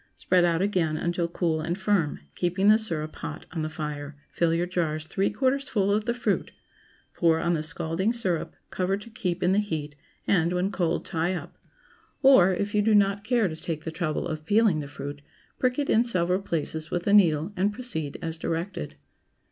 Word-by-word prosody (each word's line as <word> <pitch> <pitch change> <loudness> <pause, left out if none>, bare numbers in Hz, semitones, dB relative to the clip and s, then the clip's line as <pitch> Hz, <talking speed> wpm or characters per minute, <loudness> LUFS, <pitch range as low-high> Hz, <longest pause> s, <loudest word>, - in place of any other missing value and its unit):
Spread 180 -1 +2
out 170 +1 +2
again 175 -6 +1
until 170 +1 -1
cool 165 -2 -1
and 170 +3 -2
firm; 190 - 0
keeping 185 +3 +1
the 215 +1 +6
syrup 160 -8 -3
hot - - -6
on 160 -1 -3
the 155 - -2
fire, 150 -2 -5 0.2
fill 170 -1 +1
your 170 +1 +1
jars 160 -4 -2
three 195 +5 0
quarters 270 +5 0
full 200 -2 +1
of 210 +1 +1
the 235 - +1
fruit; 245 - -1 0.6
pour 165 -2 +3
on 170 +1 +1
the 160 - 0
scalding 165 +5 -1
syrup, 190 -9 -2 0.2
cover 190 +1 0
to 230 +3 -12
keep 180 -4 -2
in 180 - +3
the 195 - +3
heat, 155 -8 -3 0.3
and, 175 -2 +2
when 180 +2 0
cold, 175 -4 -1
tie 170 +3 -1
up. - - -8 0.6
Or, 260 -9 +7
If 200 +3 -2
you 210 - +3
do 215 +1 +3
not 200 0 +3
care 230 -2 +2
to 160 - -5
take 160 -1 -5
the 160 - -4
trouble 160 -2 -2
of 155 -1 -5
peeling 205 -1 +3
the 145 - -5
fruit, 145 0 -7 0.4
prick 250 -1 +1
it 285 -1 0
in 225 - +4
several 180 -5 +1
places 160 -3 -3
with 175 -1 -2
a 200 - +2
needle, 170 -2 +4
and 200 +2 +1
proceed 205 - -5
as 165 0 -4
directed. 170 -1 -3
175 Hz, 200 wpm, -26 LUFS, 160-205 Hz, 0.6 s, Or